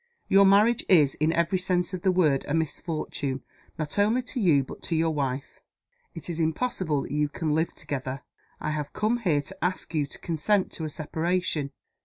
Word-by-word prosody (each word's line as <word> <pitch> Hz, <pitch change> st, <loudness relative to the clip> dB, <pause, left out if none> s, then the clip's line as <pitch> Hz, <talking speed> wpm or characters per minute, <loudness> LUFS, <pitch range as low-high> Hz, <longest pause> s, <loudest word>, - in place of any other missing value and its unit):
"Your 195 Hz, 0 st, +6 dB
marriage 210 Hz, +4 st, +5 dB
is, 150 Hz, -7 st, +6 dB
in 155 Hz, +2 st, +1 dB
every 170 Hz, +2 st, +1 dB
sense 180 Hz, 0 st, 0 dB
of 185 Hz, -, -3 dB
the 190 Hz, -, +3 dB
word, 155 Hz, -7 st, +3 dB
a 145 Hz, -, 0 dB
misfortune 155 Hz, -4 st, -2 dB, 0.3 s
not 155 Hz, +5 st, -3 dB
only 220 Hz, +5 st, +3 dB
to 250 Hz, +1 st, -4 dB
you 155 Hz, -8 st, +4 dB
but -, -, -10 dB
to 165 Hz, -, -2 dB
your 160 Hz, 0 st, +2 dB
wife. 135 Hz, -3 st, -3 dB, 0.5 s
It 165 Hz, -, -8 dB
is 170 Hz, -2 st, -3 dB
impossible 160 Hz, -, 0 dB
that -, -, -8 dB
you 150 Hz, 0 st, +1 dB
can 155 Hz, +1 st, -2 dB
live 160 Hz, +2 st, 0 dB
together. 130 Hz, -1 st, -5 dB, 0.4 s
I -, -, -2 dB
have 150 Hz, -2 st, -4 dB
come 225 Hz, +3 st, +1 dB
here 160 Hz, -10 st, +1 dB
to 145 Hz, -, -9 dB
ask 180 Hz, 0 st, -2 dB
you 150 Hz, -3 st, +1 dB
to -, -, -10 dB
consent 185 Hz, +4 st, 0 dB
to 160 Hz, -, -5 dB
a -, -, -3 dB
separation. 160 Hz, -1 st, -1 dB
160 Hz, 195 wpm, -27 LUFS, 150-185 Hz, 0.5 s, Your